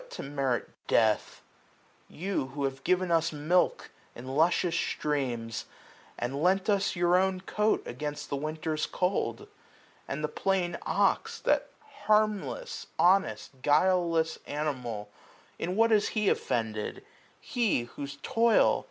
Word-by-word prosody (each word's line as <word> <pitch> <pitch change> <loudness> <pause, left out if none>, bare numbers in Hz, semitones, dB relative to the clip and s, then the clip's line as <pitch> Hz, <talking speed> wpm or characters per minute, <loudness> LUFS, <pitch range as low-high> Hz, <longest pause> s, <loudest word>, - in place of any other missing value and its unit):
To - - -7
merit 135 -3 -1 0.2
death? 110 -2 +2 0.7
you, 180 -5 -2
who 140 +1 -5
have 135 0 -3
given 185 0 +1
us 165 0 +2
milk 155 +4 +1 0.2
In 125 +2 -9
luscious 165 +5 +2
streams? 125 -9 -2 0.5
and 135 +4 -3
lent 190 +4 +3
us 200 -1 +1
your 175 0 +3
own 185 0 +2
coat 210 +3 +1
360 - - -8
Against 145 +3 -5
the - - +1
winter's 155 +2 -2
cold. 180 - -1 0.6
And 150 +2 -4
the - - +2
plain 180 +2 0
ox. - - +1
That - - +1 0.4
harmless, 215 - +1
honest, 180 -7 +2
guileless 165 +1 +2
animal. 125 -8 -3 0.5
In 180 +2 -2
what 225 +2 +4
has 210 -1 +4
he 210 -3 +1
offended? 110 -2 -2 0.3
he, 225 - 0
whose 140 +3 -8
toil. 230 0 +4
160 Hz, 125 wpm, -29 LUFS, 135-190 Hz, 0.7 s, what